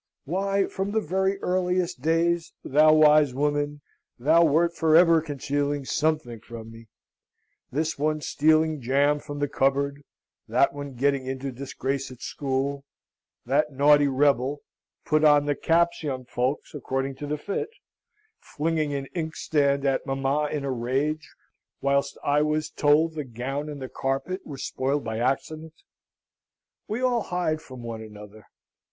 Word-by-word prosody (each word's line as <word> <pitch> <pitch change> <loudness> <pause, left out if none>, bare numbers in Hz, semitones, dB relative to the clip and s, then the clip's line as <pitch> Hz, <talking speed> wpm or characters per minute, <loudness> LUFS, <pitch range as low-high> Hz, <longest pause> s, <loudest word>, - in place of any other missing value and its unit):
Why, 195 +4 0
from 195 +2 -4
the 220 - +3
very 190 +1 0
earliest 180 -4 0
days, 165 +2 +1
thou 155 +3 +5
wise 150 -3 +5
woman, 145 +1 -1 0.4
thou 160 +7 +4
wert 170 +2 +3
for 160 -1 +3
ever 165 -1 +6
concealing 145 -1 -2
something 150 -6 -1
from 115 0 -10
me, 115 0 -13 0.8
this 155 +2 -2
one 155 +1 +1
stealing 155 0 +2
jam 140 +4 +2
from 145 0 -8
the 145 0 0
cupboard; 140 +1 0 0.5
that - - +2
one 145 -2 -7
getting 135 +1 0
into 135 +1 -4
disgrace 135 +1 -4
at 130 -2 -12
school; 140 +1 -2 0.6
that 145 +4 +1
naughty 145 +1 +5
rebel 140 0 +1 0.4
(put 155 0 +2
on 145 -1 +5
the 145 - +1
caps, 170 +3 +1
young 130 -5 -4
folks, 125 +4 -2
according 135 -1 -3
to 145 - -6
the 150 +1 -2
fit) 200 - -3 0.7
flinging 155 -1 -2
an 135 -1 -3
inkstand 145 -4 0
at 135 -1 0
mamma 135 +2 0
in 145 -2 -3
a 135 - -1
rage, 135 +5 -1 0.5
whilst 140 0 0
I 145 +1 +2
was 155 0 0
told 155 +2 +3
the 155 -1 -4
gown 135 +4 -4
and 145 -1 -7
the 130 - -5
carpet 135 +10 -3
were 140 - -7
spoiled 135 +3 -2
by 110 0 -3
accident. 155 +5 -2 1.1
We 225 +5 -3
all 245 -2 +2
hide 175 -5 -1
from 130 -4 -11
one 115 -1 -6
another. 105 -1 -12
145 Hz, 145 wpm, -25 LUFS, 135-155 Hz, 1.1 s, ever